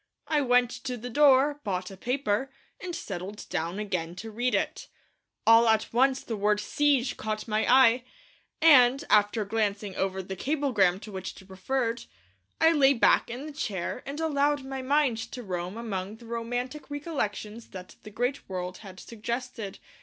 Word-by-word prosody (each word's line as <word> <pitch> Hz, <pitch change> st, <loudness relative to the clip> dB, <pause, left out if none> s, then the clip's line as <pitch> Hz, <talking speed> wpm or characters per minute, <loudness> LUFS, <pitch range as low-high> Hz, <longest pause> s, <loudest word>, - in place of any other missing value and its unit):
I 300 Hz, -2 st, +2 dB
went 245 Hz, -2 st, +3 dB
to 250 Hz, -1 st, -3 dB
the 245 Hz, +2 st, -7 dB
door, 290 Hz, +2 st, +4 dB
bought 185 Hz, -2 st, -3 dB
a -, -, -9 dB
paper, 250 Hz, +3 st, -1 dB, 0.3 s
and 355 Hz, -1 st, -5 dB
settled 195 Hz, +2 st, -6 dB
down 170 Hz, +4 st, -2 dB
again 180 Hz, -5 st, -3 dB
to 220 Hz, +4 st, -7 dB
read 240 Hz, +3 st, 0 dB
it. -, -, -2 dB, 0.6 s
All 230 Hz, +1 st, +7 dB
at 220 Hz, 0 st, +1 dB
once 265 Hz, +2 st, +3 dB
the 225 Hz, -, -4 dB
word 210 Hz, 0 st, +1 dB
'siege' 275 Hz, +1 st, +1 dB
caught 215 Hz, 0 st, -4 dB
my 215 Hz, +2 st, +1 dB
eye, 250 Hz, -1 st, +6 dB, 0.6 s
and, 275 Hz, -3 st, +7 dB
after 210 Hz, +1 st, +3 dB
glancing 205 Hz, -2 st, -1 dB
over 190 Hz, 0 st, -2 dB
the 190 Hz, +1 st, -6 dB
cablegram 230 Hz, -, +1 dB
to 215 Hz, -, -9 dB
which 190 Hz, -1 st, -6 dB
it 190 Hz, -, -16 dB
referred, 230 Hz, +5 st, -2 dB, 0.5 s
I 325 Hz, 0 st, +6 dB
lay 280 Hz, -4 st, +5 dB
back 230 Hz, -, +4 dB
in 250 Hz, +5 st, -6 dB
the 305 Hz, -, -8 dB
chair 210 Hz, -, -3 dB
and 285 Hz, +2 st, -5 dB
allowed 290 Hz, -2 st, +1 dB
my 265 Hz, 0 st, -5 dB
mind 270 Hz, -3 st, +2 dB
to 250 Hz, -, -6 dB
roam 180 Hz, 0 st, -4 dB
among 205 Hz, -3 st, -4 dB
the 235 Hz, +1 st, -15 dB
romantic 245 Hz, +5 st, -4 dB
recollections 235 Hz, -, -4 dB
that 185 Hz, -1 st, -10 dB
the 215 Hz, -, -10 dB
great 245 Hz, +5 st, -3 dB
word 185 Hz, -1 st, -4 dB
had 190 Hz, -3 st, -11 dB
suggested. 235 Hz, -2 st, -5 dB
230 Hz, 170 wpm, -28 LUFS, 200-270 Hz, 0.6 s, All